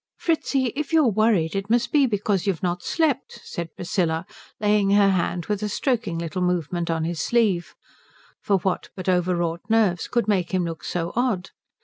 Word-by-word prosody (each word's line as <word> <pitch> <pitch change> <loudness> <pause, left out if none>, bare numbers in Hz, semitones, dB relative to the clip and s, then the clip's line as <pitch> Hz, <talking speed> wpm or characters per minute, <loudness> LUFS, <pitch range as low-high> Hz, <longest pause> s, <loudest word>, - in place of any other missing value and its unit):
"Fritzi, 275 -7 0
if 300 +1 -3
you 320 -2 +5
are 235 - +3
worried 205 -6 +2
it 195 +1 -3
must 240 +1 +2
be 285 -3 +4
because 205 -3 0
you've 190 -4 -1
not 175 0 -1
slept," 295 -6 -1
said 170 -1 -6
Priscilla, 170 -2 -1 0.3
laying 210 -1 +2
her 200 0 +5
hand 175 -2 -1
with 210 -1 -2
a 210 - -1
stroking 225 - -1
little 170 +2 -3
movement 175 -1 -1
on 165 -1 0
his 165 0 -2
sleeve; 210 -8 +1 0.7
for 200 - +2
what 190 0 -1
but 185 -1 -7
overwrought 175 -2 +1
nerves 215 -6 +2
could 235 -4 0
make 185 -3 +1
him 180 -1 +1
look 165 -1 -6
so 175 -1 -3
odd? 220 -7 0
195 Hz, 185 wpm, -24 LUFS, 175-225 Hz, 0.7 s, you